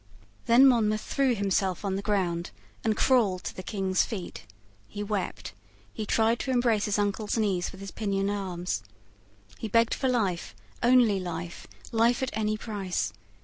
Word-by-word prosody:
Then 240 Hz, +4 st, +7 dB
Monmouth 215 Hz, -5 st, +3 dB
threw 270 Hz, -3 st, +1 dB
himself 195 Hz, -1 st, 0 dB
on 190 Hz, -1 st, 0 dB
the 195 Hz, -, -2 dB
ground, 185 Hz, -5 st, -1 dB, 0.3 s
and 220 Hz, -1 st, +1 dB
crawled 215 Hz, -9 st, +3 dB
to -, -, -5 dB
the -, -, -6 dB
King's 190 Hz, -1 st, 0 dB
feet. 190 Hz, -, -6 dB, 0.4 s
He 205 Hz, -, -5 dB
wept. 205 Hz, -2 st, -3 dB, 0.4 s
He 215 Hz, -3 st, -5 dB
tried 225 Hz, +2 st, +2 dB
to -, -, -4 dB
embrace 240 Hz, -4 st, +2 dB
his 210 Hz, 0 st, 0 dB
uncle's 205 Hz, +2 st, -1 dB
knees 195 Hz, -5 st, 0 dB
with 190 Hz, -, -12 dB
his 195 Hz, -, -7 dB
pinioned 200 Hz, -2 st, -1 dB
arms. 180 Hz, -, -3 dB, 0.8 s
He 225 Hz, -, -3 dB
begged 230 Hz, +2 st, +3 dB
for 265 Hz, -, 0 dB
life, 200 Hz, -9 st, -1 dB, 0.3 s
only 240 Hz, -5 st, +5 dB
life, 175 Hz, -1 st, -6 dB, 0.2 s
life 235 Hz, +3 st, +3 dB
at 260 Hz, -, -1 dB
any 215 Hz, 0 st, 0 dB
price. 200 Hz, -, -3 dB
205 Hz, 160 wpm, -28 LUFS, 190-230 Hz, 0.8 s, Then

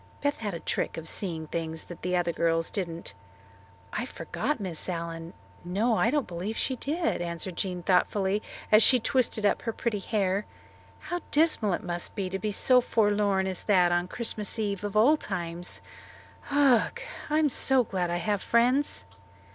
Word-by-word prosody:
Beth 285 Hz, 0 st, +1 dB
had 205 Hz, -5 st, -3 dB
a -, -, -5 dB
trick -, -, -2 dB
of 165 Hz, 0 st, -5 dB
seeing 165 Hz, -5 st, -2 dB
things 160 Hz, 0 st, -4 dB
that 175 Hz, -, -11 dB
other 175 Hz, -1 st, +1 dB
girls 165 Hz, 0 st, 0 dB
didn't. 170 Hz, -, -4 dB, 0.8 s
"I 230 Hz, -, -2 dB
forgot 295 Hz, +1 st, -3 dB
Miss 185 Hz, -4 st, -3 dB
Allen. 165 Hz, -1 st, -5 dB, 0.3 s
No, 210 Hz, +7 st, +1 dB
I 230 Hz, -, +3 dB
don't 290 Hz, 0 st, +1 dB
believe 180 Hz, +6 st, -5 dB
she 260 Hz, -, -1 dB
did," 315 Hz, -, -1 dB
answered 170 Hz, +1 st, -4 dB
Jean 180 Hz, -2 st, -3 dB
thoughtfully 190 Hz, +2 st, +2 dB, 0.3 s
as 215 Hz, +1 st, +8 dB
she 250 Hz, +3 st, +6 dB
twisted 230 Hz, -3 st, +1 dB
up 205 Hz, -, +2 dB
her 230 Hz, -, -2 dB
pretty 220 Hz, -2 st, -2 dB
hair. 195 Hz, 0 st, -1 dB, 0.5 s
"How 350 Hz, -, -3 dB
dismal 290 Hz, -, +3 dB
it -, -, -3 dB
must 175 Hz, -1 st, -3 dB
be 190 Hz, -2 st, -3 dB
to 195 Hz, -, -2 dB
be 210 Hz, +2 st, -2 dB
so 250 Hz, +5 st, +4 dB
forlorn 205 Hz, -4 st, +2 dB
as 190 Hz, -1 st, -3 dB
that 180 Hz, -4 st, +4 dB
on 175 Hz, 0 st, +1 dB
Christmas 220 Hz, +1 st, 0 dB
Eve 205 Hz, -3 st, -2 dB
of 205 Hz, 0 st, -2 dB
all 275 Hz, +9 st, +6 dB
times. 175 Hz, -, -3 dB, 0.7 s
Ugh! 280 Hz, -, +3 dB, 0.3 s
I'm 305 Hz, 0 st, +3 dB, 0.4 s
glad 180 Hz, -2 st, -1 dB
I 175 Hz, -, 0 dB
have 205 Hz, +2 st, -1 dB
friends." 250 Hz, -, +2 dB
200 Hz, 165 wpm, -28 LUFS, 175-230 Hz, 0.8 s, as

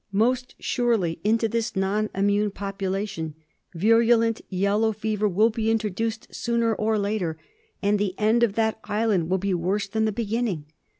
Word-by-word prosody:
Most 245 Hz, +5 st, +1 dB
surely 225 Hz, -9 st, 0 dB
into 225 Hz, +2 st, +2 dB
this 230 Hz, +1 st, -2 dB
non 200 Hz, +3 st, 0 dB
immune 205 Hz, +2 st, +2 dB
population 195 Hz, -4 st, -4 dB, 0.4 s
virulent 230 Hz, +4 st, +3 dB
yellow 205 Hz, +4 st, +1 dB
fever 215 Hz, 0 st, -1 dB
will 215 Hz, +5 st, +3 dB
be 225 Hz, 0 st, -1 dB
introduced 225 Hz, 0 st, -2 dB
sooner 235 Hz, -1 st, 0 dB
or 215 Hz, +1 st, 0 dB
later, 200 Hz, -6 st, -1 dB, 0.5 s
and 205 Hz, +1 st, +2 dB
the 200 Hz, -2 st, -1 dB
end 220 Hz, +2 st, +3 dB
of 235 Hz, -4 st, +3 dB
that 220 Hz, 0 st, 0 dB
island 210 Hz, -5 st, 0 dB
will 190 Hz, -, +2 dB
be 195 Hz, +1 st, -1 dB
worse 190 Hz, +4 st, 0 dB
than 220 Hz, +2 st, 0 dB
the 215 Hz, -, +1 dB
beginning. 220 Hz, -6 st, -2 dB
210 Hz, 155 wpm, -25 LUFS, 195-225 Hz, 0.5 s, virulent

